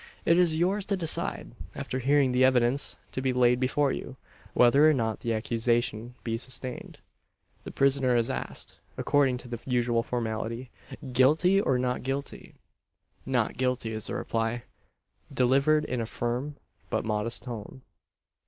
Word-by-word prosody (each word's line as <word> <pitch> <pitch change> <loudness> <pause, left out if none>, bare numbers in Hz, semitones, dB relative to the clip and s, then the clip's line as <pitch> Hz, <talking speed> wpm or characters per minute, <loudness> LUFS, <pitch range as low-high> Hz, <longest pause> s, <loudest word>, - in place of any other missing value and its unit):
It 170 +1 +4
is 165 -3 +3
yours 190 +5 +1
to 200 - -1
decide 165 -3 -1 0.2
after 130 - -4
hearing 135 0 +3
the 125 +1 +3
evidence 130 +1 +3
to 130 - -3
be 130 -1 0
laid 125 0 +3
before 135 +2 +1
you 130 - -6 0.4
whether 140 +5 +6
or 155 - +3
not 110 -3 -1
the 115 - -3
accusation 115 +1 -1
be 115 -1 -2
sustained." 130 0 -5 0.7
The - - -6
prisoner 135 -2 +2
is 115 -1 +2
asked, - - -4 0.2
according 135 -3 +2
to 125 - -11
the 120 -1 -6
usual 120 -2 +1
formality, 115 +1 -4 0.4
"Guilty, 160 +10 +4
or 135 -9 +1
not 125 0 -1
guilty?" 135 +2 -5 0.7
"Not - - 0
guilty," 125 -3 -1
is 110 -1 -2
the - - -4
reply; 115 +1 -2 0.7
delivered 140 +4 +3
in 125 -4 -2
a 115 - -3
firm, 125 +6 -3 0.3
but - - -1
modest 110 +2 0
tone. 120 +1 -8
125 Hz, 150 wpm, -27 LUFS, 120-140 Hz, 0.7 s, whether